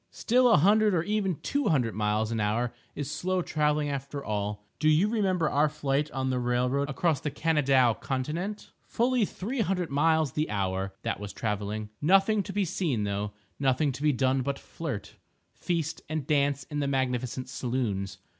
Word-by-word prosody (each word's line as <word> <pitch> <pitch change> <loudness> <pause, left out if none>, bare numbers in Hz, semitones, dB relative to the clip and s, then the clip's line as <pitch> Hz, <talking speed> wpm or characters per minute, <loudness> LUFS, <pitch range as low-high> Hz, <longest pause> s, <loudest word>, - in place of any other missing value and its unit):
Still 250 +2 +3
a 225 - +6
hundred 205 +5 +4
or 165 - +1
even 200 -2 0
two 285 0 0
hundred 125 -8 +2
miles 105 +1 0
an 115 - -1
hour 115 +4 0 0.2
is 145 0 -4
slow 180 +4 -1
travelling 150 -1 +1
after 140 0 -4
all. 105 0 -3
Do 155 - +3
you 155 +6 +4
remember 190 -7 +1
our 150 +1 +3
flight 145 0 -1
on 130 -1 -2
the 125 - 0
railroad 125 +3 0
across 150 +1 +1
the 150 - -2
Kanadaw 140 -5 +3
continent?—fully 205 - -1
three 230 +7 -3
hundred 180 -5 -1
miles 155 0 +3
the 150 +3 -1
hour—that 95 -1 -2
was 100 -1 -6
travelling. 105 0 -3
Nothing 195 +6 +4
to 195 - -6
be 200 0 0
seen 155 - -1
though—nothing 105 +8 -1
to 135 +2 -8
be 150 0 +4
done 130 0 +1
but 140 +2 -2
flirt, 140 -11 -6 0.4
feast 165 -3 -2
and 155 -3 -2
dance 140 -2 +1
in 150 +1 -5
the 140 - 0
magnificent 130 -2 -1
saloons. 115 -7 -2
140 Hz, 165 wpm, -28 LUFS, 120-165 Hz, 0.4 s, a